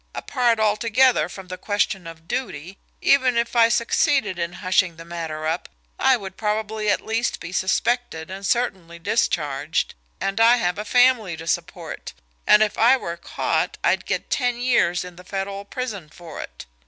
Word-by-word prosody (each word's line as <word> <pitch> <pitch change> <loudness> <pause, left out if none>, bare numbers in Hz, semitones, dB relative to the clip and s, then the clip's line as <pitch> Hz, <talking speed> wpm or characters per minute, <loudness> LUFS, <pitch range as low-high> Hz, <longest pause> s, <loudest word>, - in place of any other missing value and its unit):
Apart 240 -4 +1
altogether 220 -2 +3
from 190 +1 -10
the 185 0 -7
question 200 -3 -1
of 165 0 -11
duty, 185 - -4 0.2
even 255 -3 +4
if 235 +1 0
I 230 -1 +6
succeeded 235 -3 +1
in 170 0 -2
hushing 185 -1 +1
the 165 +1 -11
matter 165 -2 -5
up, 165 +3 -2 0.3
I 265 -1 +4
would 190 -3 -9
probably 215 0 -1
at - - +1
least 225 +2 -1
be 165 - -8
suspected 185 -2 0
and 195 +1 -7
certainly 190 -7 -1
discharged, 160 -6 0 0.3
and 195 +2 -2
I 230 +2 +7
have 180 -5 -1
a 210 - -4
family 240 -6 +3
to 165 - -8
support - - -4 0.3
and 210 +1 +7
if 210 - -2
I 245 +4 +6
were 170 -9 -5
caught - - -2
I'd - - +1
get - - -3
ten 245 -2 +1
years 235 -8 +2
in 180 -1 -11
the 180 - -12
Federal 195 +1 -4
prison 200 -8 -5
for 165 0 -9
it. - - -10
200 Hz, 170 wpm, -23 LUFS, 175-235 Hz, 0.3 s, I